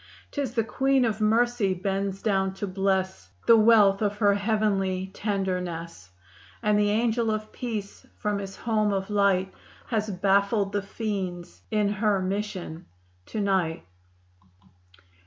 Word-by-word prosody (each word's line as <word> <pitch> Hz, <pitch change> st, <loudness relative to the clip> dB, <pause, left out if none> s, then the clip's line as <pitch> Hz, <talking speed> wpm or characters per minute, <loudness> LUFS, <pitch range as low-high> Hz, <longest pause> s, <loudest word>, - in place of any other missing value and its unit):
'Tis 275 Hz, -4 st, -3 dB
the 225 Hz, -, +2 dB
Queen 265 Hz, +2 st, +2 dB
of 220 Hz, -1 st, -2 dB
Mercy 225 Hz, -2 st, +2 dB
bends 195 Hz, +1 st, -2 dB
down 195 Hz, -3 st, +1 dB
to 205 Hz, -, -3 dB
bless 190 Hz, -, -1 dB, 0.2 s
The 230 Hz, -, +7 dB
wealth 215 Hz, -3 st, +5 dB
of 205 Hz, -1 st, 0 dB
her 205 Hz, -1 st, +4 dB
heavenly 200 Hz, -3 st, 0 dB
tenderness, 180 Hz, -, -3 dB, 0.5 s
And 210 Hz, -1 st, +3 dB
the 205 Hz, 0 st, +3 dB
Angel 225 Hz, +1 st, +1 dB
of 215 Hz, 0 st, -3 dB
Peace 215 Hz, -5 st, -6 dB
from 210 Hz, -1 st, -1 dB
his 195 Hz, -1 st, -7 dB
home 215 Hz, -2 st, 0 dB
of 195 Hz, +1 st, -3 dB
light 195 Hz, -2 st, +2 dB, 0.4 s
Has 215 Hz, -2 st, -1 dB
baffled 200 Hz, +1 st, +2 dB
the 205 Hz, -, -1 dB
fiends 195 Hz, -4 st, -5 dB
in 210 Hz, -2 st, +1 dB
her 205 Hz, -1 st, +1 dB
mission 185 Hz, -3 st, -4 dB, 0.4 s
to 215 Hz, -, -3 dB
night! 190 Hz, -, 0 dB
200 Hz, 135 wpm, -26 LUFS, 190-215 Hz, 0.5 s, The